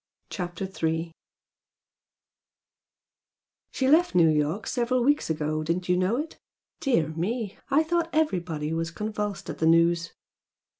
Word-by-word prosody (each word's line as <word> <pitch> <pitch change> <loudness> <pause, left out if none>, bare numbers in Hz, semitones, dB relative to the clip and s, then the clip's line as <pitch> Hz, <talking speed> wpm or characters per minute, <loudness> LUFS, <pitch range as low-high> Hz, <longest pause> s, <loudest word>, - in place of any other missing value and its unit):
CHAPTER 180 0 -4
III 165 +1 0 2.6
"She 260 - -1
left 320 - +4
New 165 -2 +6
York 155 +6 0
several 245 0 0
weeks 290 - +2
ago, 155 0 -1
didn't 175 +3 -2
you 180 - +4
know 185 +6 +1
it? 310 +3 -5 0.4
Dear 235 - +1
me! 200 +6 -3
I 290 +3 +4
thought 335 +1 0
everybody 175 - -1
was 165 0 -1
convulsed 210 +2 -4
at - - -9
the 160 - +2
news!" 165 0 +3
180 Hz, 130 wpm, -26 LUFS, 165-245 Hz, 2.6 s, New